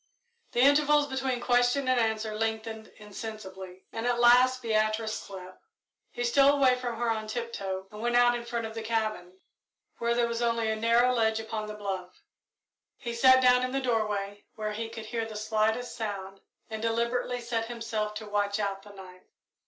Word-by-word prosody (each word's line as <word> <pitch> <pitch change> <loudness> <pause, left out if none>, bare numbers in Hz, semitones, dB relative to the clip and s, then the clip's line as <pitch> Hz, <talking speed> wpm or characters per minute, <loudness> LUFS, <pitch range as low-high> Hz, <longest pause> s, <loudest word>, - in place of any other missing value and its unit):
The 240 - +2
intervals 290 +2 +5
between 265 -2 -2
question 245 +2 +2
and 255 -1 +3
answer 220 -1 0
lengthened 220 0 -3
insensibly, 195 -3 -9
and 225 +2 -2
at 240 -1 +1
last 250 +1 +5
Beatrice 215 0 0
slept. 185 -3 -9 0.5
He 240 - -4
stole 275 +4 +4
away 260 -2 +5
from 245 -2 -4
her 235 0 0
on 220 -1 -3
tiptoe 210 -5 -4
and 210 0 -9
went 240 +1 0
out 245 0 +5
in 240 0 -3
front 235 -1 -3
of 220 - -6
the 225 - -5
cabin, 215 -5 -2 0.6
where 235 0 +1
there 240 -1 +2
was 235 0 -3
only 230 -2 +1
a - - 0
narrow 235 +3 +3
ledge 220 -2 +1
upon 220 -1 -4
the 215 - -6
bluff. 190 -3 -6 0.7
He 235 -3 -5
sat 260 +2 +6
down 250 0 +6
in 255 0 -2
the 270 - +1
doorway, 210 -5 -2
where 215 -1 -3
he 225 +2 -4
could 225 -1 -8
hear 225 0 -3
the 220 - -9
slightest 220 +3 0
sound, 195 -3 -5 0.3
and 220 -1 -6
deliberately 235 +2 -1
set 235 -1 -2
himself 225 -3 -3
to 215 0 -6
watch 205 0 0
out 200 -2 -2
the 205 0 -14
night. 185 -2 -13
225 Hz, 185 wpm, -28 LUFS, 215-240 Hz, 0.7 s, sat